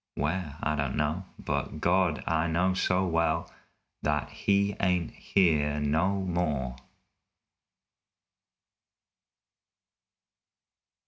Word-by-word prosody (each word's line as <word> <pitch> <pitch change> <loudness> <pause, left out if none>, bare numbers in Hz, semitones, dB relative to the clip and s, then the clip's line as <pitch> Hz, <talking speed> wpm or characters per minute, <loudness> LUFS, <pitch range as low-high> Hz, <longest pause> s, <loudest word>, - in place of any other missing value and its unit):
Where? 75 -1 -2
I 75 +1 +1
don't 70 -3 -1
know, 75 +5 -1
but 75 - -3
God! 90 -1 +2
I 80 0 +1
know 90 +3 +2
so 95 0 +1
well 85 -2 0 0.5
That 75 -1 -1
he 100 0 +1
ain't 90 -3 +1
here 75 -6 +2
no 80 +7 +1
more! 75 -8 -1
85 Hz, 85 wpm, -29 LUFS, 75-95 Hz, 0.5 s, God